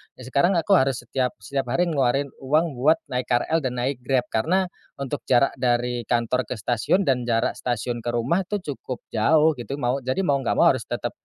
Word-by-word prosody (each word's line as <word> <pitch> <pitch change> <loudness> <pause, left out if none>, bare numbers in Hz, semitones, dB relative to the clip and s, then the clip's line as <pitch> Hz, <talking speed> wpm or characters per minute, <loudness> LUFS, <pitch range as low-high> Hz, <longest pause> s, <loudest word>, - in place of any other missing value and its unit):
Ya 130 - -12
sekarang 140 +9 +2
aku 170 +3 0
harus 135 -9 +3
setiap 125 +1 -2
setiap 135 +3 -3
hari 170 +9 +1
ngeluarin 140 -1 +1
uang 155 +5 +1
buat 155 +5 +5 0.2
naik 125 0 -2
KRL 125 +7 +1
dan 130 -5 -3
naik 125 +2 -2
Grab. 125 0 +1
Karena 180 +11 +1 0.2
untuk 140 +1 -4
jarak 130 +2 +4
dari 120 -1 0
kantor 120 0 0
ke - - -4
stasiun 120 - +1
dan 125 -6 0
jarak 115 -1 0
stasiun 120 0 -2
ke 115 - -9
rumah 125 +11 0
tu 205 -2 -3
cukup 135 -4 -6
jauh 155 +8 +4
gitu 130 +3 -5
mau 130 -1 -1
jadi 130 +8 -1
mau 140 -6 +2
enggak 130 - -1
mau - - +6
harus - - -4
tetap - - -3
130 Hz, 205 wpm, -24 LUFS, 120-145 Hz, 0.2 s, mau